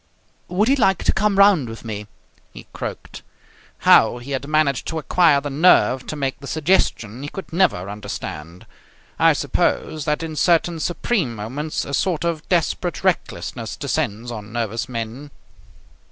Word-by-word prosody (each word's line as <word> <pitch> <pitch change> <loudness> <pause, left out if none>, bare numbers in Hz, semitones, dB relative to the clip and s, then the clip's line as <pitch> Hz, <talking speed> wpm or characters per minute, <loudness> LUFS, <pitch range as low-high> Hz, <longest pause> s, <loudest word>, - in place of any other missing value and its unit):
"Would 190 +5 +1
he 270 - +4
like 195 -8 +2
to - - +2
come 205 0 +1
round 195 - +5
with 115 +1 -9
me?" 105 -2 -5 0.5
he - - -11
croaked. - - -7 0.6
How - - +6
he 120 +3 -9
had 135 +1 -3
managed 150 -4 +1
to 160 - -3
acquire 160 0 +3
the 145 0 -5
nerve 135 -4 +4
to - - -4
make 135 -3 -2
the 140 - -9
suggestion 140 - 0
he 145 - -5
could 190 -1 -9
never 165 - +2
understand. 90 -5 -7 0.5
I - - +6
suppose 155 -2 -1
that 150 +1 0
in 160 -1 -5
certain 170 +1 +2
supreme 175 - -1
moments 130 +9 -4
a 140 - -7
sort 170 +2 0
of 165 -2 -3
desperate 175 -3 0
recklessness - - -2
descends 115 +4 -2
on 110 -2 -8
nervous 115 0 -3
men. 120 +4 -5
145 Hz, 155 wpm, -21 LUFS, 115-170 Hz, 0.6 s, How